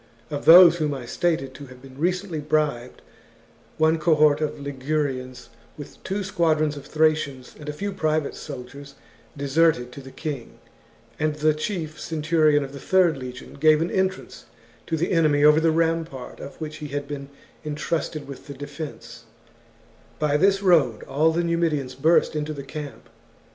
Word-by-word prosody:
Of 145 -1 -4
those 175 0 +9
whom 150 -3 -1
I 130 -3 -7
stated 135 -2 -1
to 140 +1 -10
have 130 0 -14
been 130 0 -14
recently 180 0 -1
bribed, 145 -5 -1 0.7
one 160 +1 +3
cohort 155 -2 +4
of 150 -1 -2
Ligurians, 135 -2 -3 0.3
with 145 - -11
two 200 +2 -3
squadrons 160 -6 +1
of 145 - -10
Thracians 155 -5 0
and 150 0 -7
a - - -3
few 200 +7 -4
private 155 -4 -1
soldiers, 140 0 -9 0.4
deserted 140 -3 +2
to 140 - -10
the 135 - -11
king, 140 -3 -6 0.6
and 155 0 0
the 155 +1 +2
chief 155 -1 -4
centurion 155 -2 +2
of 135 0 -8
the 140 - -8
third 185 -1 +3
legion 125 -2 -9
gave 155 0 +5
an 165 +2 -1
entrance 190 0 -2 0.4
to 165 - -1
the 170 +3 -1
enemy 155 -4 +3
over 150 +1 +7
the 165 0 +3
rampart 165 -4 -1
of 140 - -9
which 155 -1 -6
he 150 - -6
had 145 0 -4
been 140 -1 -6 0.3
entrusted 155 0 -3
with 140 +1 -10
the 140 - -8
defence; 145 +2 -8 0.9
by 150 -1 +1
this 195 +5 +3
road 150 - +3
all 155 +4 +2
the 170 +2 0
Numidians 165 -6 0
burst 155 +4 +2
into 150 0 -2
the 140 -2 -7
camp. 140 -4 -8
150 Hz, 165 wpm, -24 LUFS, 140-165 Hz, 0.9 s, those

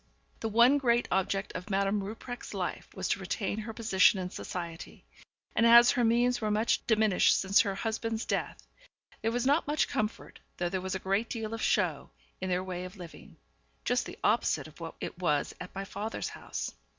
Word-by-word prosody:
The 225 - -2
one 240 +6 +5
great 240 -3 +2
object 195 +1 0
of 180 +3 -6
Madame 200 +1 +1
Rupprecht's 225 +3 -7
life 185 -2 -4
was 190 -1 -2
to - - +1
retain 195 +2 -2
her 220 +1 -5
position 215 -3 +4
in 180 -1 -4
society; 170 -1 -7 0.5
and - - +3
as 235 +1 +8
her 245 - +1
means 240 +2 +2
were 215 - 0
much 215 +2 +1
diminished 215 -4 +4
since 195 +1 +3
her 200 -3 -2
husband's 225 +1 -2
death, - - -3 0.6
there 225 - 0
was 245 +1 -1
not 290 +4 +3
much 295 0 +1
comfort, 215 +1 -3 0.2
though 175 0 -1
there 185 +1 -2
was 190 0 -3
a - - +1
great 195 +4 -1
deal 225 -2 -4
of 225 - -4
show, - - +1 0.3
in 185 - -2
their 180 0 0
way 180 -1 -5
of 185 +3 -9
living; 175 -3 -12 0.5
just 245 0 +1
the - - -9
opposite 225 +3 +2
of 155 - -16
what 165 -1 -7
it - - -6
was 150 -5 0
at 180 - -9
my 195 +1 -4
father's 210 +3 -4
house. - - -5
210 Hz, 195 wpm, -30 LUFS, 185-230 Hz, 0.6 s, as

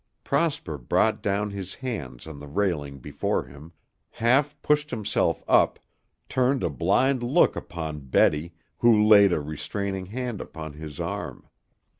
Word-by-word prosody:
Prosper 140 - -1
brought - - +1
down 100 +1 -1
his 95 -1 -6
hands 80 - -6
on 80 -3 -9
the 75 - -10
railing 75 -5 -1
before 65 - -2
him, 70 +5 -13 0.4
half 140 +5 +1
pushed 150 0 +2
himself 105 - 0
up, - - +4 0.5
turned 130 +1 +1
a - - 0
blind 125 +9 +2
look 130 +9 +3
upon 80 -3 -5
Betty, 75 +4 +1 0.2
who 110 -3 +5
laid 100 -2 +7
a 85 - +1
restraining 95 +6 -4
hand 120 0 -4
upon 80 -2 -8
his 75 -1 -9
arm. - - -5
100 Hz, 140 wpm, -25 LUFS, 75-120 Hz, 0.5 s, laid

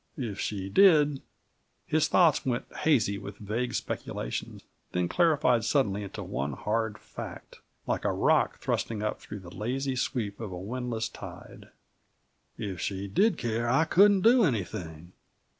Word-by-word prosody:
If 115 -8 -4
she 95 -2 -3
did 150 - +5 0.3
" - - -45 0.3
His 155 0 +2
thoughts 170 -5 +4
went 125 -2 -1
hazy 110 -10 +2
with 100 +1 -8
vague 115 +4 -3
speculation, - - -4 0.3
then 90 -1 +1
clarified 140 - +3
suddenly 105 -6 +1
into 100 - -6
one 70 +2 -3
hard 110 +6 -1
fact, - - -9 0.3
like - - -1
a - - +1
rock - - +2
thrusting 110 -2 -2
up 105 - -2
through 105 -1 -8
the 85 -1 -11
lazy 130 +4 -2
sweep 110 -6 -2
of 110 -4 -5
a 90 - -5
windless 115 +3 -3
tide. - - -11 0.9
"If 95 -3 -5
she 100 0 -3
did 185 - +2
care, 115 0 -1
I 135 +6 +4
couldn't 200 +4 +5
do 235 +4 +6
anything. 90 - -3
115 Hz, 150 wpm, -28 LUFS, 100-140 Hz, 0.9 s, do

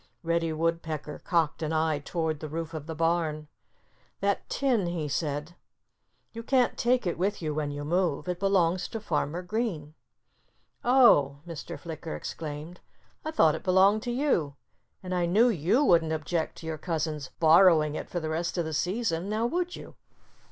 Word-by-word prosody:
Reddy 165 -1 0
Woodpecker 160 -2 -2
cocked 165 -3 0
an 155 0 -2
eye 160 -2 +1
toward 160 +1 -2
the 155 - -6
roof 165 +1 -5
of 155 -1 -6
the 160 - -5
barn. 165 -2 0 0.7
"That 200 0 -1
tin—" 245 -9 +1
he 170 -3 -2
said—"you 150 +9 -7
can't 250 +1 +2
take 250 -1 +1
it 170 -2 -2
with 200 +3 0
you 155 -3 -2
when 150 -1 -2
you 145 0 -5
move. 175 -1 0
It 180 -1 -2
belongs 185 -2 +2
to 225 - -5
Farmer 175 -3 -2
Green." 180 -7 -3 0.9
"Oh!" 145 - +5
Mr. 165 -3 -7
Flicker 155 - -6
exclaimed. 155 - -6 0.4
"I 310 - -3
thought 165 - +4
it - - -5
belonged 195 +3 +4
to 240 - -3
you. 240 - 0 0.5
And 185 0 -4
I 175 -1 +1
knew 220 +8 +4
you 195 - +2
wouldn't 165 - +3
object 160 +1 -2
to - - -10
your 160 -1 -4
cousin's 155 -4 -3
borrowing 160 -2 +6
it - - -5
for 175 - -2
the 160 -1 -4
rest 170 +3 -2
of 170 - 0
the 160 - -4
season—now 200 +4 -1
would 355 +7 -1
you?" - - -10
165 Hz, 165 wpm, -28 LUFS, 155-195 Hz, 0.9 s, borrowing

